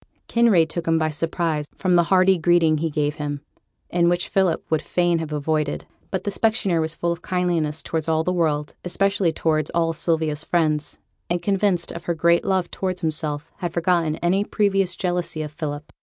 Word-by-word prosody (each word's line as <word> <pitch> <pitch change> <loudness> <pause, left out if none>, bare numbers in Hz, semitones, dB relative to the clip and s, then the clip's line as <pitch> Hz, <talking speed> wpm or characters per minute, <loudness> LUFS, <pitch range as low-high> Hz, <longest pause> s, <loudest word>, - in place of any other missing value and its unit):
Kinraid 220 -9 +4
took 170 +1 -5
him 165 0 +3
by 155 -1 0
surprise 160 0 -1
from 185 -1 0
the 170 -1 +4
hearty 190 +1 +4
greeting 165 -2 +3
he 165 +1 -1
gave 150 0 -1
him, 145 -2 -4 0.5
and 170 -1 +3
which 175 0 0
Philip 190 -4 +1
would 160 -1 +2
fain 175 +2 +1
have 160 -2 -5
avoided. 150 0 -1 0.2
But 190 -1 -3
the 205 - -2
specksioneer 205 -5 +1
was 160 +1 -3
full 170 +1 -1
of 170 0 -4
kindliness 170 -5 0
towards 160 -1 -2
all 160 0 +2
the 180 - 0
world, 150 -4 0
especially 195 0 +1
towards 155 -1 0
all 165 -1 +2
Sylvia's 160 -2 0
friends, 155 -3 0 0.3
and, 175 +1 0
convinced 195 -1 0
of 170 0 -8
her 170 - -1
great 170 +1 +3
love 190 -3 0
towards 185 -1 -3
himself, 155 -1 -2
had 175 -3 -4
forgotten 170 -2 +1
any 190 +4 +2
previous 195 -4 +1
jealousy 175 -3 -2
of 150 - -6
Philip. 150 -1 -6
170 Hz, 185 wpm, -23 LUFS, 155-180 Hz, 0.5 s, Kinraid